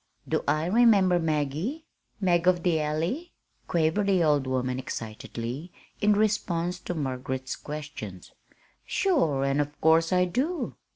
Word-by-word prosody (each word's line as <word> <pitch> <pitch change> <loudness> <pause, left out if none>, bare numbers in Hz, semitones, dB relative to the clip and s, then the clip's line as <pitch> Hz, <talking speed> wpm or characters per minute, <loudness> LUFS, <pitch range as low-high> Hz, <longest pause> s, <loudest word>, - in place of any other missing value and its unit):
"Do - - 0
I 155 +2 +2
remember 195 -3 +5
'Maggie'? 160 - -1 0.3
'Mag 180 -3 +2
of 175 -2 +3
the 170 -3 +2
Alley'?" 165 - -2 0.3
quavered 170 +5 +1
the 190 -3 +3
old 145 -4 +2
woman 130 0 -1
excitedly 120 +5 -6 0.3
in 210 0 +5
response 180 -4 0
to 180 - -5
Margaret's 130 -2 -3
questions. 145 - -8 0.5
"Sure, 165 - +1
an' 140 +1 +1
of 145 0 -2
course 165 +1 +4
I 180 0 +4
do! 280 - -1
165 Hz, 130 wpm, -27 LUFS, 140-190 Hz, 0.5 s, remember